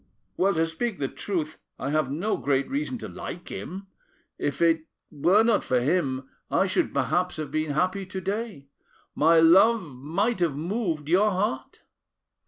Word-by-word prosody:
"Well, 195 0 +2
to 165 0 +2
speak 195 +6 -3
the 135 - -1
truth, 160 -1 -4 0.2
I 140 - -3
have 155 -3 +1
no 175 +10 -1
great 135 +1 0
reason 275 -2 -2
to - - -7
like 175 - -8
him. 195 +3 -6 0.5
If 145 - -2
it 165 -1 +3 0.3
were 175 +8 +4
not 230 -2 +2
for 125 - +1
him, 135 -2 0 0.2
I - - +2
should - - 0
perhaps 180 0 0
have 155 -3 -5
been 155 0 -1
happy 185 +5 0
to 190 0 -5
day; 195 -6 -4 0.4
my 165 +2 +5
love 180 - +5
might 185 - -1
have 165 -5 +1
moved 165 -2 -2
your 190 +6 +4
heart. 185 -10 -3
170 Hz, 165 wpm, -26 LUFS, 150-195 Hz, 0.5 s, my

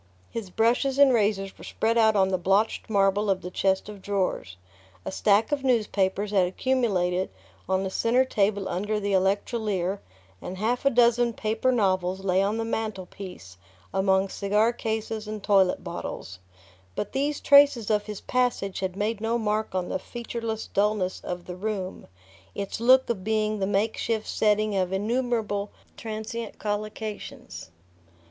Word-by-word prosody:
His 225 -5 -5
brushes 240 +7 +1
and 280 -2 +6
razors 200 -3 +1
were - - -11
spread 225 +1 0
out 220 -2 +4
on 190 -1 +3
the 185 -1 0
blotched 195 +6 +1
marble 200 0 +2
of 190 -1 +1
the 180 - -7
chest 190 +1 +1
of 210 -2 -9
drawers. 185 - -2 0.5
A - - -3
stack 205 +4 +2
of 285 -2 0
newspapers 210 -5 +1
had 190 -3 +3
accumulated 190 -5 0 0.4
on 190 0 +1
the 190 - -3
centre 245 +6 +2
table 200 -4 0
under 205 +4 -1
the 200 -1 -1
"electrolier", 195 0 0 0.4
and 185 - -6
half 235 +6 -1
a - - +7
dozen 240 -1 +3
paper 220 +4 0
novels 190 -4 +1
lay 185 0 +3
on 205 +3 0
the 225 - -2
mantelpiece 190 - -6 0.4
among 190 0 +2
cigar 210 +4 +1
cases 220 -2 -3
and 215 -2 -6
toilet 195 -3 +3
bottles; 95 +1 -6 0.6
but 205 - -3
these 285 +2 -1
traces 280 -6 +5
of 210 0 +1
his 210 -2 -6
passage 245 -6 0
had 185 -1 -3
made 210 +1 -2
no 225 +1 0
mark 215 -3 -1
on 180 -1 -1
the - - -2
featureless 230 0 -5
dulness 200 -2 0
of 175 0 -5
the 180 - -6
room, 195 -1 -4 0.5
its 200 +1 -4
look 260 +2 +6
of 215 -6 -2
being 215 0 0
the 190 - 0
makeshift 215 +2 0
setting 215 -1 +1
of 185 -1 0
innumerable 215 -1 -1 0.3
transient 220 +1 -6
collocations. 210 - -5
210 Hz, 155 wpm, -26 LUFS, 190-225 Hz, 0.6 s, a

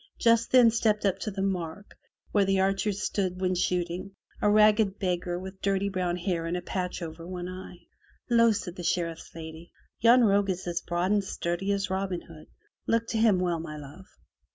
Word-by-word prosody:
Just 230 0 +3
then 245 -3 +7
stepped 215 -2 +1
up 195 - +1
to - - -3
the 195 -1 -3
mark 185 0 -4 0.4
where 205 - +3
the 195 0 +2
archers 195 +1 0
stood 185 -3 -1
when 185 -1 +1
shooting, 180 +2 -2 0.3
a 210 - +3
ragged 210 -1 +4
beggar 175 -2 -1
with 190 +1 -9
dirty 200 0 +1
brown 180 -2 -1
hair 175 -2 -2
and 175 +2 -1
a - - -4
patch 180 -1 -3
over 165 +1 -8
one 180 -1 -5
eye. 185 -1 -8 0.5
"Ho!" 230 -1 +5
says 185 -4 -3
the 180 - -8
Sheriff's 165 -1 -2
lady, 160 +1 -9 0.3
"Yon 235 +2 +6
rogue 200 -2 +3
is 185 0 -2
as 175 -1 -2
broad 175 +2 -1
and 205 -1 +2
sturdy 180 +1 -2
as 195 -1 -1
Robin 190 -2 -2
Hood. 155 -2 -14 0.4
Look 230 0 +2
to 225 - -1
him 220 -4 +4
well, 175 -2 0
my 155 -2 -6
love." 150 +6 -11
190 Hz, 195 wpm, -28 LUFS, 175-205 Hz, 0.5 s, then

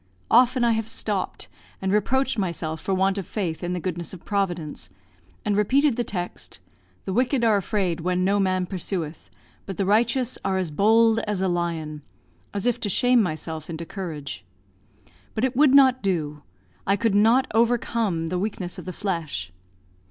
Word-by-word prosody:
Often 250 +1 +5
have 225 -2 +2
I - - -16
stopped 210 -4 -2 0.3
and 190 0 -1
reproached 260 +4 +2
myself 160 -4 -3
for - - -3
want 190 +1 +2
of 190 - -6
faith 180 -6 -3
in 175 +1 -1
the 180 - -2
goodness 175 0 -4
of 175 - -15
Providence, 175 - -2 0.6
and 210 -1 +1
repeated 260 +6 +3
the 240 - 0
text, 180 -5 -5 0.5
"The 190 - -2
wicked 250 +2 +1
are 225 -2 +5
afraid 190 -3 0
when 180 +2 0
no 200 +2 +2
man 185 -1 +1
pursueth: 175 -4 -4 0.4
but 195 - -5
the 195 - 0
righteous 235 +5 +2
are 190 -1 0
as 180 -4 -2
bold 225 +6 +4
as 210 -2 -1
a 190 - +1
lion," 165 -4 -2 0.5
as 205 +2 -3
if 245 -2 +1
to 205 - -2
shame 245 +4 +4
myself 160 -3 -4
into 165 0 -5
courage. 150 - -6 0.9
But 220 - -1
it 260 -1 +1
would 280 0 +5
not 260 -2 +6
do; 155 -7 -1 0.5
I 195 - +4
could 225 0 +1
not 225 +6 +5
overcome 225 -7 +1
the 180 +1 -1
weakness 190 -3 -4
of - - -9
the 185 - -5
flesh. 160 - -3
195 Hz, 175 wpm, -24 LUFS, 175-225 Hz, 0.9 s, not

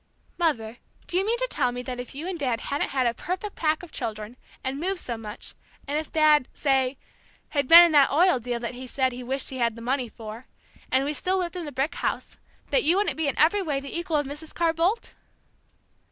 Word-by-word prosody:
"Mother, 240 -9 0 0.3
do - - -3
you 375 - +3
mean 450 +4 +1
to - - 0
tell 255 - 0
me 245 0 -5
that 250 0 -5
if 245 +2 -7
you 310 +5 -5
and 370 -3 -4
Dad 250 -5 0
hadn't 285 +3 -2
had 260 -2 0
a 235 - +2
perfect 370 - -4
pack 310 +1 0
of 355 - -11
children, 215 +1 -5 0.3
and 265 +1 -3
moved 370 +3 -1
so 240 - -4
much, 220 -1 -8 0.3
and 285 - -2
if 310 0 -3
Dad 305 -4 +4
say 265 -2 +1 0.5
had 285 -3 0
been 340 +3 +11
in 340 - +1
that 285 -3 +6
oil 345 -1 +4
deal 240 0 -3
that 240 +1 -3
he 255 +1 -8
said 260 0 0
he 250 +1 -7
wished 265 +3 -2
he 260 - -5
had 235 -2 +1
the - - -10
money 255 0 -1
for, 220 +2 -9 0.4
and 265 +1 +3
we 295 - -1
still 370 +5 0
lived 360 -1 -2
in 350 -2 -4
the 295 - -6
brick 280 +5 -1
house, - - -3 0.3
that - - +4
you 345 +4 +4
wouldn't 410 - +1
be 320 -2 -1
in 275 - -1
every 335 +8 +4
way 295 -7 -1
the 275 +2 -7
equal 340 -2 0
of 290 - 0
Mrs. 295 +3 -8
Carr 335 -1 +2
Boldt?" 360 +8 0
285 Hz, 240 wpm, -26 LUFS, 250-335 Hz, 0.5 s, been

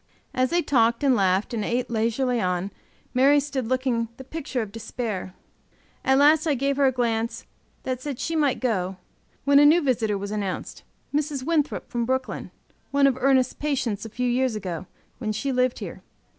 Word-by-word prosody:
As 255 0 +1
they 345 0 +1
talked 235 -1 +2
and 270 -3 +4
laughed 190 +1 +1
and 220 -3 -1
ate 240 +3 -1
leisurely 235 +2 +1
on, 180 +1 -1 0.4
Mary 275 +3 +5
stood 270 -4 -3
looking 255 -2 0
the 265 - -8
picture 275 -3 -3
of 205 - -9
despair. 220 -4 -5 0.7
At 265 0 +4
last 305 +3 +5
I 295 - +2
gave 275 +2 0
her 280 -1 +4
a - - +3
glance 230 -2 -1 0.4
that 255 -1 -3
said 280 -2 -4
she 330 - -2
might 290 -4 +2
go, 190 -7 -1 0.5
when 280 0 +6
a - - +7
new 320 +4 +6
visitor 230 -8 0
was 200 +1 -5
announced 200 -3 -4 0.3
Mrs. 290 -2 -1
Winthrop, 305 0 0
from 240 -2 -2
Brooklyn, 260 +1 -2 0.4
one 280 0 +3
of 270 -2 +4
Ernest's 260 -1 +3
patients 250 -8 -2
a 225 - -6
few 250 +3 -2
years 250 -1 +1
ago, 185 -4 -5 0.3
when 220 -4 -2
she 270 +6 -2
lived 255 -1 +1
here. - - -7
250 Hz, 185 wpm, -25 LUFS, 225-275 Hz, 0.7 s, a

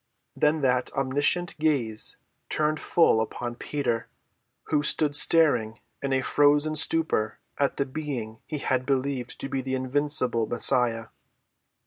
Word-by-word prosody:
Then 150 +1 +1
that 125 -2 0
omniscient 145 +6 0
gaze 130 -9 0 0.3
turned 155 0 0
full 165 -10 +3
upon 120 +2 -4
Peter, 120 -2 -3 0.6
who 150 -2 0
stood 150 0 +1
staring 125 -9 +4 0.2
in 140 - -3
a 130 0 +1
frozen 145 +2 +2
stupor 155 -8 +1 0.2
at 140 - 0
the 140 - 0
being 130 -6 -6
he 155 - -4
had 130 -2 -1
believed 135 -2 -2
to - - -4
be 135 -1 -3
the 130 0 -3
invincible 130 -3 +1
Messiah. 115 -1 +2
135 Hz, 130 wpm, -26 LUFS, 120-150 Hz, 0.6 s, staring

